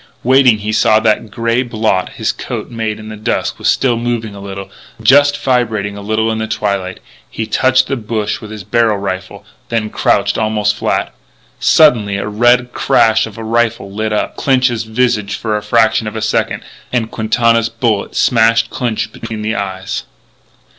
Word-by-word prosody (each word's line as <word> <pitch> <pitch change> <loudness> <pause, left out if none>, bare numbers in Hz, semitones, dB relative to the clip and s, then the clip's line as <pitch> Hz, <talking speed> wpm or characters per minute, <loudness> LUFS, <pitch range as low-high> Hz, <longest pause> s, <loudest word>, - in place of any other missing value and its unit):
Waiting, 130 -2 +5
he 105 +1 -3
saw 110 0 +4
that 110 -1 +2
the 115 - -13
grey 115 +3 0
blot 110 -6 -1
his - - -1
coat - - -6
made 110 -2 -3
in 110 0 -9
the 110 - -7
dusk 110 +2 -2
was - - -2
still 125 -3 +2
moving 115 -2 -2
a 100 - -10
little 100 0 -8 0.3
just 145 +5 +5
vibrating 110 -6 0
a 100 - -8
little 110 +2 0
bit 115 - +1
in 110 - -2
the 110 - -2
twilight. 100 -4 -2 0.3
He 110 - -4
touched 130 +3 +2
the 135 - -2
bush 110 -3 -3
with 110 - -9
his 105 -3 -8
rifle 115 -1 +2 0.5
barrel, - - -32 0.2
then 110 -2 -1
crouched - - +1
almost 105 -1 +1
flat. - - -1 0.5
Suddenly 110 -10 +4
the 100 - -3
red 120 +3 +2
crash 110 0 +3
of 110 - -12
a 115 - -6
rifle 115 -3 0
lit 110 +1 -2
up 105 - -2
Clinch's 125 -4 +1
visage 110 -3 0
for 110 -2 -2
a 105 - -1
fraction 110 0 +2
of 105 - -6
a 110 - -3
second. - - -1 0.3
And 115 -3 -1
Quintana's 115 +1 +1
bullet 115 -3 -1
smashed 115 -1 +3
Clinch 110 -3 -2
between 110 -2 -7
the 110 +1 -1
eyes. 95 -3 -4
110 Hz, 180 wpm, -15 LUFS, 105-120 Hz, 0.5 s, Waiting